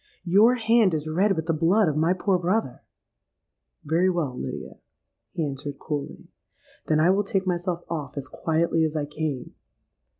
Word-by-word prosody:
'Your 205 +8 +5
hand 225 -6 +3
is 155 0 -3
red 190 +6 +2
with 160 -1 -3
the 165 - 0
blood 175 +6 +3
of 150 - 0
my 160 +3 +2
poor 185 0 +1
brother.'—'Very 170 - -4
well, 165 -8 -1
Lydia,' - - -6 0.5
he 165 - -2
answered 140 0 -6
coolly; 145 -1 -5 0.6
'then 155 -1 +2
I 170 +4 +5
will 200 +2 +2
take 195 -1 -1
myself 175 -1 -2
off 150 -4 -5
as 140 - -4
quietly 165 0 0
as 160 0 -1
I 150 -2 -1
came. 150 -3 -4
165 Hz, 160 wpm, -25 LUFS, 150-185 Hz, 0.6 s, Your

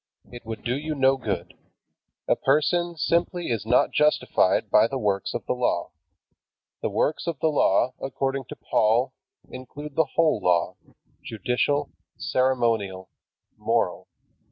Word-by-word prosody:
It 120 -1 -10
would 110 -1 -6
do 120 - -1
you 155 +2 -3
no 135 -1 +4
good. 95 -8 -4 0.7
A - - +3
person 165 +5 +1
simply 170 0 0
is 110 -2 -2
not 125 - +3
justified 150 0 +2
by - - +6
the 135 - -3
works 100 -5 -1
of - - -4
the - - 0
Law. 125 -8 -1 0.9
The - - -1
works 155 - -1
of 165 -5 -3
the 160 - +2
Law, 130 -4 +2
according 135 0 -2
to - - -9
Paul, 120 +5 +1 0.4
include 145 +3 -9
the 160 0 +2
whole 165 -2 +3
Law, 85 -1 +1 0.5
judicial, 125 +6 -1 0.3
ceremonial, 115 -8 0 0.5
moral. - - -1
130 Hz, 135 wpm, -25 LUFS, 110-150 Hz, 0.9 s, by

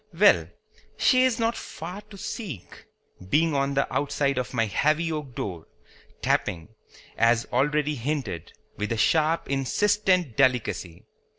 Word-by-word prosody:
Well, - - +6 0.5
she 255 -1 +4
is 255 -3 +1
not 230 0 0
far 175 +7 -7
to 200 - -11
seek, 185 - -7 0.4
being 160 +6 +3
on 140 0 0
the 140 - +2
outside 140 -2 0
of 125 - -4
my 115 -3 +1
heavy 155 +9 +1
oak 150 -6 -5
door, 85 -5 -5 0.6
tapping, 85 0 0 0.5
as 115 0 +3
already 150 +3 +1
hinted, 135 - -3 0.3
with 105 +2 -3
a 115 - 0
sharp 160 +8 +2
insistent 180 - +1
delicacy. 115 -8 0
140 Hz, 130 wpm, -26 LUFS, 120-165 Hz, 0.6 s, Well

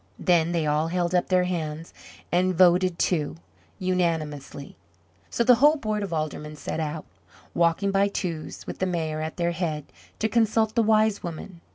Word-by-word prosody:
Then 170 -2 +2
they 170 -2 0
all 150 +2 +1
held 175 +1 -1
up 180 - +2
their 185 -1 +3
hands, 165 -3 -4 0.4
and 185 +1 +2
voted 180 0 +4
to, 155 -5 0 0.4
unanimously. 160 -7 -2 0.5
So 235 - 0
the 250 - +7
whole 300 +2 +7
board 215 -7 -2
of 200 -3 -4
Aldermen 155 -1 -4
set 150 - -5
out, 155 0 -4 0.5
walking 170 +4 +2
by 195 +1 +3
twos, 170 -5 -5
with - - -7
the 190 - 0
Mayor 160 -3 -2
at 160 0 -5
their 170 -1 0
head, 160 -4 -3 0.3
to 220 - 0
consult 220 -1 +2
the 230 - +3
Wise 215 -1 +3
Woman. 170 +1 -8
175 Hz, 170 wpm, -25 LUFS, 160-195 Hz, 0.5 s, the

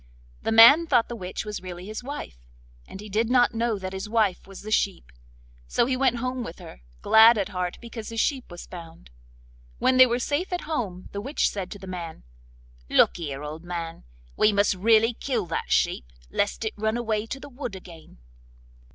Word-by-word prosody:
The - - -2
man 240 +9 +8
thought 245 -6 +3
the 240 - -5
witch 185 -1 -6
was 210 -1 -5
really 180 -1 -8
his 215 +4 -6
wife, 270 - -7 0.5
and - - -10
he 210 - -9
did 220 +3 0
not 245 -1 +4
know 230 -1 0
that 190 -1 -6
his 190 +2 -5
wife 215 -6 +1
was 195 0 -11
the 215 - -7
sheep; 190 - 0 0.6
so - - +2
he 255 +1 0
went 255 -1 +2
home 255 +1 -3
with 165 - -8
her, - - -12 0.2
glad 225 +1 +7
at 200 - -1
heart 180 -1 -3
because 230 -2 -8
his 225 0 -4
sheep 265 0 0
was 175 -1 -9
found. 165 - -12 0.7
When 255 - +2
they 255 0 +9
were 240 0 0
safe 290 +9 -2
at 360 - -2
home 215 - -4
the 200 - -5
witch 275 +7 0
said 190 -3 -4
to - - -10
the 190 - -11
man: 175 -3 -7 0.7
'Look - - +4
here, 145 -4 -5
old 155 +2 -7
man, 170 -2 -6 0.3
we 215 - +4
must 200 0 +2
really 220 +4 +3
kill 235 -4 -2
that 165 - -4
sheep - - +1 0.3
lest 205 +2 -1
it 220 - -2
run 220 +2 -1
away 220 -2 -2
to 270 - -5
the 285 - -10
wood 245 -6 -7
again. 170 - -13
215 Hz, 205 wpm, -25 LUFS, 185-240 Hz, 0.7 s, they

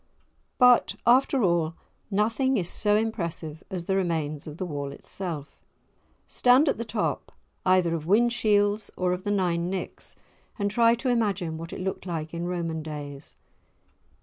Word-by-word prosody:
But, 250 -1 +5
after 255 +1 +4
all, 170 -3 +1 0.3
nothing 230 +6 +1
is 175 -5 -1
so 210 +3 +2
impressive 170 -8 -2
as 180 -3 -4
the 190 - 0
remains 160 -6 -1
of 150 0 -8
the 185 - -3
wall 145 -4 -4
itself. 155 0 -6 0.7
Stand 255 +5 +4
at 275 - +1
the - - -1
top 220 -1 -2 0.4
either 185 -2 +4
of 160 -1 -4
Whinshields 210 -1 +2
or 180 -1 +1
of 180 +2 -5
the - - -1
Nine 175 -4 0
Nicks, 190 0 -5 0.4
and 200 -2 -1
try 230 +2 +4
to 245 +2 -2
imagine 200 -9 0
what 165 +1 -7
it - - -6
looked 190 0 -4
like 160 -2 -4
in 170 +1 -3
Roman 165 -3 -2
days. 145 -2 -7
185 Hz, 155 wpm, -26 LUFS, 165-215 Hz, 0.7 s, But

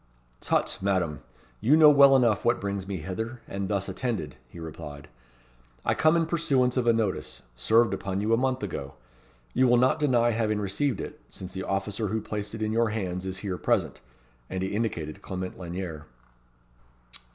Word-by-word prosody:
"Tut! - - 0
Madame. 95 -6 0 0.4
You 145 +7 +4
know 155 -2 +9
well 140 -1 +7
enough 120 -6 +3
what 120 - +2
brings 100 -1 -3
me 100 -1 -3
hither, 110 +9 -5
and 100 0 -3
thus 100 -1 -1
attended," 115 -12 -3
he 85 - -11
replied. 75 -3 -8 0.8
"I - - +3
come 155 +1 +4
in 165 - +2
pursuance 140 -7 +1
of 125 -2 0
a - - +7
notice, 110 -4 -2
served 110 - +3
upon 95 0 -3
you 110 +3 +1
a - - +7
month 130 -1 0
ago. 70 -8 -5 0.6
You 130 +1 +4
will 120 0 +5
not 130 +5 +3
deny 120 -5 +3
having 110 -2 0
received 105 +7 -1
it, - - -8
since 95 0 -9
the 95 - -4
officer 100 +2 -1
who 110 +3 -1
placed 105 0 -5
it 110 - -3
in 110 - 0
your 115 0 +2
hands 95 -4 -3
is 95 0 -4
here 95 -3 -3
present." - - 0 0.5
And 95 0 -3
he 95 - -1
indicated 100 -6 -3
Clement 95 -2 -5
Lanyere. 85 -4 -6
105 Hz, 180 wpm, -27 LUFS, 95-120 Hz, 0.8 s, know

